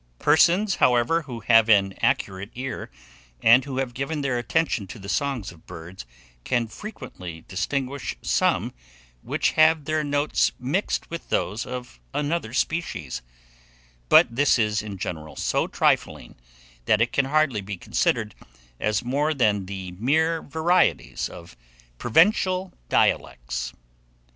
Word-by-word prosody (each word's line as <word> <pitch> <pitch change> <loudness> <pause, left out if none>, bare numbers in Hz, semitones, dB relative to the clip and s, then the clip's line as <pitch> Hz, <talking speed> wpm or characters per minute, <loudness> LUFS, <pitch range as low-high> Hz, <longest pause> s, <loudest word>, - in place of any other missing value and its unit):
Persons; 175 - +3
however, 125 +7 +3
who 125 -6 -8
have 115 0 +5
an 100 -3 +4
accurate 95 +2 0
ear, 130 +1 -5 0.5
and 120 +3 +7
who 135 -2 -5
have 130 -2 -2
given 140 +4 -3
their 130 -3 0
attention 120 -5 0
to 100 - -9
the 100 -2 -10
songs 130 -3 -2
of 85 -2 -19
birds, 85 -4 -10 0.4
can 120 - 0
frequently 90 - -9
distinguish 130 +8 -3
some - - +1 0.5
which - - 0
have 155 -1 +4
their 155 0 0
notes 145 +1 +1
mixed 150 +11 -2
with 170 - -7
those 105 +5 -1
of 125 - -7 0.2
another 150 -5 -1
species; 120 - -2 0.9
but 115 - +6
this 145 +1 +4
is 105 -3 +1
in 105 -2 -7
general 80 -4 -6
so - - 0
trifling, - - 0 0.5
that 110 - +3
it 115 +1 +1
can 140 - +2
hardly 140 -6 +1
be 100 0 -6
considered 105 +4 0 0.5
as 105 +2 0
more 145 +5 0
than 105 -7 +1
the 95 -2 -6
mere 155 - +1
varieties 160 - +1
of 85 0 -12 0.4
provincial 185 - +2 0.2
dialects. - - 0
125 Hz, 135 wpm, -24 LUFS, 100-155 Hz, 0.9 s, and